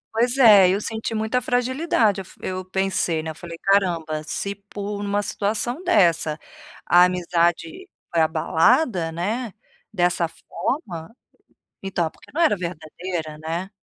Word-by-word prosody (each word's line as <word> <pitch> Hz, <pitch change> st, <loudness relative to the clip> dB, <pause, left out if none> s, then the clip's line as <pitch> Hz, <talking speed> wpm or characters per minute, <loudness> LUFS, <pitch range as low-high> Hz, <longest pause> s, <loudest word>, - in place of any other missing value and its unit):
Pois 240 Hz, +3 st, +2 dB
é, 210 Hz, -8 st, +8 dB
eu 190 Hz, +2 st, +1 dB
senti 220 Hz, +1 st, -4 dB
muita 220 Hz, +4 st, 0 dB
fragilidade, 245 Hz, -, +1 dB
eu -, -, -8 dB
f -, -, -17 dB
eu 185 Hz, 0 st, -3 dB
pensei, 185 Hz, -3 st, -1 dB
né, 160 Hz, -, -4 dB
eu -, -, -11 dB
falei: 170 Hz, 0 st, -9 dB
"Caramba, 170 Hz, -6 st, +1 dB
se 200 Hz, +6 st, -3 dB
por 200 Hz, +1 st, -6 dB
uma 205 Hz, 0 st, -1 dB
situação 215 Hz, -, -2 dB
dessa 170 Hz, -, +3 dB, 0.5 s
a 175 Hz, +1 st, +6 dB
amizade 175 Hz, -, -1 dB, 0.2 s
foi 170 Hz, -, +2 dB
abalada, 165 Hz, -, +2 dB
né, 210 Hz, +8 st, -3 dB, 0.4 s
dessa 175 Hz, -3 st, +1 dB
forma, 170 Hz, -, -5 dB, 0.7 s
então, 180 Hz, -4 st, -1 dB
por -, -, -25 dB
que -, -, -17 dB
não 310 Hz, -, -2 dB
era 315 Hz, -11 st, +4 dB
verdadeira". 170 Hz, -1 st, -5 dB
Né? 170 Hz, +4 st, -3 dB
190 Hz, 145 wpm, -23 LUFS, 170-220 Hz, 0.7 s, é